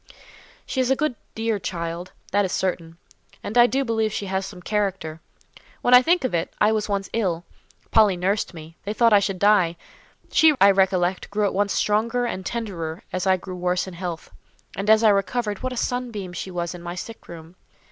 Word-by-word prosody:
"She 260 - -1
is 255 - 0
a 265 - +4
good, 305 0 0 0.2
dear 225 -1 -1
child, 170 -1 -5 0.2
that 205 +1 +3
is 190 - -2
certain; 170 -4 -2 0.5
and 210 - -5
I 240 0 +7
do 270 +2 0
believe 225 -2 0
she 200 - -3
has 190 0 -2
some 195 -2 -10
character. 190 -5 -2 0.6
When 245 - +3
I 250 - +10
think 345 +4 +2
of 255 - -1
it, 170 0 -1
I 210 - +4
was 215 -1 -1
once 200 -1 -1
ill; 180 -7 -1 0.5
Polly 210 -4 +5
nursed 195 +4 0
me; 160 +1 -11
they 205 - -3
thought 230 0 +4
I 205 - +7
should 195 -1 -2
die; 185 -4 +3 0.5
she, 315 -2 +5
I 200 0 +7
recollect, 190 -1 +1
grew 210 +1 0
at 200 - 0
once 200 +1 +1
stronger 230 +4 +1
and 190 -5 -4
tenderer 185 -5 -4
as 185 +1 -1
I 190 0 +4
grew 185 0 -8
worse 180 0 0
in 190 - -9
health. 175 -2 -6 0.4
And 200 +2 -3
as 220 +1 +6
I 220 - +7
recovered, 205 +1 0
what 255 - -2
a 250 - -6
sunbeam 235 -8 -3
she 180 - -5
was 175 -1 -3
in 175 - -9
my 175 0 -6
sick 225 +5 -8
room! 165 +1 -11
195 Hz, 210 wpm, -23 LUFS, 180-220 Hz, 0.6 s, I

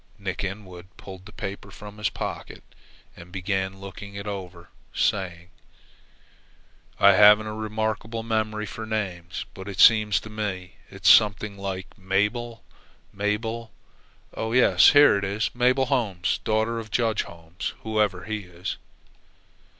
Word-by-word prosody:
Nick 100 -3 -4
Inwood 95 -2 -7
pulled 95 0 -11
the - - -13
newspaper 100 0 -7
from 105 +1 -11
his 105 - +1
pocket - - -6 0.5
and 85 +1 -13
began 95 0 -2
looking 100 +1 -9
it 100 0 -6
over, 90 -4 -7 0.3
saying: 90 -2 -1 1.5
"I 100 - +8
haven't 105 +2 +7
a 110 - -5
remarkable 110 +1 -3
memory 110 -1 -1
for 110 +3 -7
names, 95 -5 -4
but 95 +1 -9
it 95 - -7
seems 105 -2 +6
to 110 - -10
me 95 -4 -5
it's - - -4
something 105 -1 +5
like 95 -1 -6
Mabel 105 +4 -1 0.5
Mabel 110 +3 -2 0.6
oh 110 0 -3
yes, 125 0 +6
here 145 -8 +7
it 100 +2 -1
'Mabel 125 +2 +2
Holmes, 100 -8 0
daughter 110 +1 0
of 110 -1 -8
Judge 110 0 +1
Holmes,' 85 +1 -7
whoever 105 -4 0
he 110 -1 -3
is." 90 -2 -6
105 Hz, 135 wpm, -25 LUFS, 95-110 Hz, 1.5 s, I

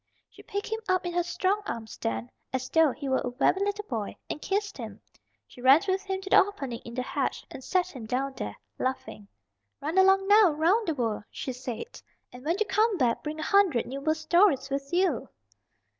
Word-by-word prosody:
She - - -15
picked 405 0 -4
him 445 0 -3
up 370 -1 +2
in 350 - -3
her 350 - +2
strong 370 +4 0
arms 220 -2 -5
then, 115 +1 -3 0.2
as 260 -1 -3
though 320 -3 +5
he 280 +2 -6
were 265 0 +2
a - - -2
very 250 +9 +2
little 410 +1 -2
boy, 220 - -4 0.2
and 300 - -5
kissed 405 +1 -1
him. 215 -3 -7 0.5
She 245 - -15
ran 265 +4 +7
with 380 0 +1
him 385 -1 -3
to 385 - -7
the - - +8
opening 275 - -6
in 235 - -10
the 255 - -1
hedge 275 +1 -2
and 265 - -9
set 365 +3 +1
him 230 -4 -7
down 265 +3 -1
there, - - -5 0.2
laughing. 260 -5 -3 0.5
"Run 320 +6 0
along 385 0 +5
now 410 -5 +6
'round 360 +9 +2
the 325 - 0
world," 225 -5 -2
she 260 - -5
said. 250 - -7 0.3
"And 250 0 -11
when 330 +4 +1
you 435 - +2
come 425 +1 +2
back 245 -6 +1
bring 305 +1 -5
a - - -3
hundred 380 - +3
new 275 +2 -6
World 310 +2 +1
Stories 315 -4 +3
with 275 0 -3
you!" 350 -7 +1
310 Hz, 215 wpm, -28 LUFS, 255-385 Hz, 0.5 s, the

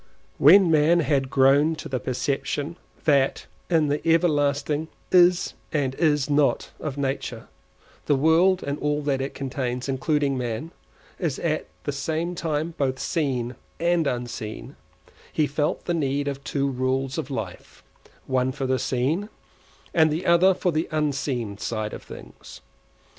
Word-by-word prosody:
When 175 +4 +7
man 160 +3 +4
had 140 -4 +1
grown 140 +4 +4
to - - -7
the 130 -1 -2
perception 140 +5 -2 0.3
that 140 -3 +2 0.2
in 165 -3 +3
the 145 +1 0
everlasting 150 -2 +1 0.2
Is 180 -1 +4 0.2
and 140 -4 0
Is 150 -2 +2
Not 145 -1 +1
of 145 -3 -5
nature, 135 -4 -3 0.6
the 145 - +4
world 165 +6 +3
and 140 +1 -3
all 150 0 -1
that 140 -2 0
it 135 - -4
contains, 130 -2 -3
including 140 +1 0
man, 125 +7 -4 0.5
is 160 -7 -1
at 155 -2 -1 0.2
the 145 - -2
same 160 +5 -2
time 160 -1 -2
both 130 -2 0
seen 130 -7 -1 0.3
and 170 -2 +2
unseen, 120 - -5 0.6
he 155 - +2
felt 145 +1 -1
the 175 - 0
need 140 -3 -1
of 140 -1 -4
two 140 -1 -1
rules 130 +2 -1
of 155 - -5
life, 110 -9 -7 0.4
one 130 -1 +1
for 135 0 -4
the 130 0 +1
seen, 135 - -1 0.6
and 160 -2 +5
the 160 +4 -2
other 175 +2 +5
for 180 - 0
the 160 +1 -1
unseen 135 -8 -2
side 110 -2 -3
of - - -7
things. - - -12
145 Hz, 145 wpm, -24 LUFS, 130-160 Hz, 0.6 s, When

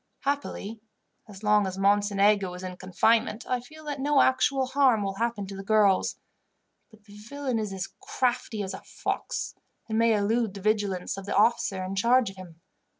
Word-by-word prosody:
Happily, 250 -6 -3 0.5
as 205 -1 -12
long 210 -1 +3
as 190 0 -5
Mocenigo 200 0 +3
is 180 - -9
in 185 -1 -5
confinement, 210 +5 +1
I 250 - 0
feel 310 +6 -14
that 290 -2 -4
no 285 +1 +2
actual 260 +1 +3
harm 260 -5 +3
will 195 -1 -2
happen 230 -2 -1
to 195 0 -8
the 195 - -7
girls; 205 -2 +3 0.7
but 215 -2 -20
the 205 -1 -17
villain 250 +3 -3
is 210 -2 -3
as 190 -2 -4
crafty 250 - -1
as 190 0 -5
a - - -7
fox, - - -4 0.3
and 220 -1 0
may 230 -1 +4
elude 210 0 0
the 200 - -7
vigilance 205 -3 -1
of 195 0 -8
the - - -2
officer 205 -3 +2
in 190 +1 -4
charge 235 +2 +3
of 195 - -18
him. 175 -3 -12
210 Hz, 185 wpm, -27 LUFS, 195-245 Hz, 0.7 s, may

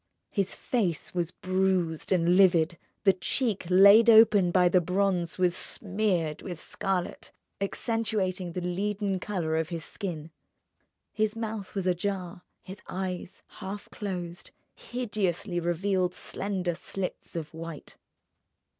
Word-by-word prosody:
His 195 -3 -1
face 195 - -1
was 175 -2 0
bruised 185 -3 0
and 175 -1 +3
livid; 175 -3 +4 0.2
the 195 -2 +6
cheek 200 0 -1
laid 200 +5 +8
open 220 -5 +7
by 180 0 +4
the 180 +1 +4
bronze 180 0 0
was 180 -1 +2
smeared 185 -8 0
with 175 -4 -6
scarlet, 190 +1 -3 0.3
accentuating 195 -4 -1
the 180 - -3
leaden 195 +1 -1
colour 175 -5 -2
of 160 -1 -1
his 165 -2 -5
skin. 165 -6 -6 0.8
His 215 0 0
mouth 220 -3 -5
was 195 -2 -1
ajar; 180 0 -2 0.2
his 190 +2 -10
eyes, 185 -1 -5 0.2
half 200 +2 -7
closed, 180 -4 -5 0.2
hideously 205 -7 -2
revealed 180 +2 0
slender 190 -3 -3
slits 185 +2 -5
of 160 -2 -5
white. 165 -2 -8
185 Hz, 120 wpm, -28 LUFS, 175-200 Hz, 0.8 s, laid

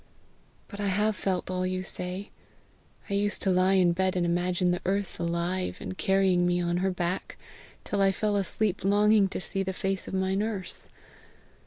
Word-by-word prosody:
But 205 - -10
I 205 - -1
have 210 +3 +1
felt 185 -2 -2
all 185 0 -1
you 185 0 -1
say. 185 +2 -6 0.8
I - - -4
used 205 +1 0
to 195 - +2
lie 185 +1 +3
in 180 -2 +4
bed 185 +2 0
and 180 -1 +1
imagine 175 +1 +1
the 175 - -1
earth 195 0 -1
alive 170 +2 -1
and - - -6
carrying 190 -2 +2
me 175 0 +2
on 175 0 0
her 190 +2 +1
back, 180 0 -3 0.5
till 200 - -1
I 195 0 +5
fell 210 +1 0
asleep 200 +1 0
longing 205 +1 +4
to - - -5
see 195 +1 -2
the 190 0 -2
face 195 0 -2
of - - -4
my 190 0 0
nurse. 200 -2 -3
190 Hz, 185 wpm, -28 LUFS, 180-200 Hz, 0.8 s, I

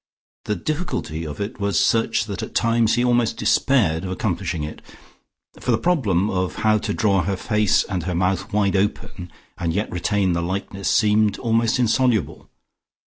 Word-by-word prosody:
The 105 - -1
difficulty 85 - -3
of 75 -1 -7
it 105 +4 -5
was 100 -1 +1
such 115 0 +2
that - - -5
at - - -7
times 115 -1 +2
he 120 - +1
almost 120 -2 +1
despaired 95 -12 +2
of 95 - -4
accomplishing 90 -3 -2
it, 75 - -7 0.8
for - - -6
the - - +4
problem 105 - +1
of 95 -3 -2
how 110 0 +4
to 105 - -3
draw 100 -4 +2
her 95 +1 -2
face 105 +1 +2
and 95 -2 -3
her 90 +1 -3
mouth 90 +2 -1
wide 100 -1 +1
open 95 -2 -2 0.3
and 85 -1 -1
yet 105 +2 -2
retain 95 +1 0
the 85 - -1
likeness 95 +2 -3
seemed 105 -1 +3
almost 115 -1 +1
insoluble. 115 - 0
100 Hz, 170 wpm, -22 LUFS, 90-115 Hz, 0.8 s, the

